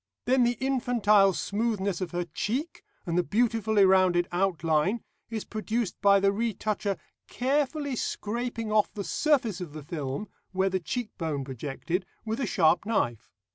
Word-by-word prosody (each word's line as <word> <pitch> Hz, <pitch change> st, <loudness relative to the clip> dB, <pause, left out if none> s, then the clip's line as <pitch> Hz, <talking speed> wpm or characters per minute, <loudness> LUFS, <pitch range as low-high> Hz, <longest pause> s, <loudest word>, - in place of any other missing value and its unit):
Then 255 Hz, 0 st, +4 dB
the 240 Hz, -1 st, +1 dB
infantile 235 Hz, -7 st, +3 dB
smoothness 200 Hz, -1 st, -1 dB
of 185 Hz, -, -2 dB
her 175 Hz, +1 st, -2 dB
cheek, 255 Hz, -, -3 dB, 0.2 s
and 170 Hz, -, -2 dB
the -, -, +2 dB
beautifully 220 Hz, -1 st, +2 dB
rounded 185 Hz, -2 st, +4 dB
outline, 175 Hz, +2 st, +1 dB, 0.3 s
is 225 Hz, -2 st, -4 dB
produced 220 Hz, -1 st, -3 dB
by 200 Hz, -1 st, +6 dB
the 195 Hz, 0 st, +3 dB
retoucher 210 Hz, -2 st, -1 dB, 0.3 s
carefully 285 Hz, +1 st, 0 dB
scraping 230 Hz, 0 st, -3 dB
off 215 Hz, -1 st, +3 dB
the 205 Hz, -, -5 dB
surface 245 Hz, -, +1 dB
of 165 Hz, -5 st, -6 dB
the 155 Hz, -1 st, -7 dB
film 145 Hz, +4 st, -4 dB, 0.3 s
where 190 Hz, +1 st, +2 dB
the 185 Hz, -, +1 dB
cheekbone 165 Hz, -, -3 dB
projected 145 Hz, -, -4 dB, 0.2 s
with 220 Hz, +3 st, -2 dB
a 265 Hz, -, 0 dB
sharp 170 Hz, -2 st, +3 dB
knife. 120 Hz, -, -1 dB
205 Hz, 145 wpm, -28 LUFS, 175-235 Hz, 0.3 s, by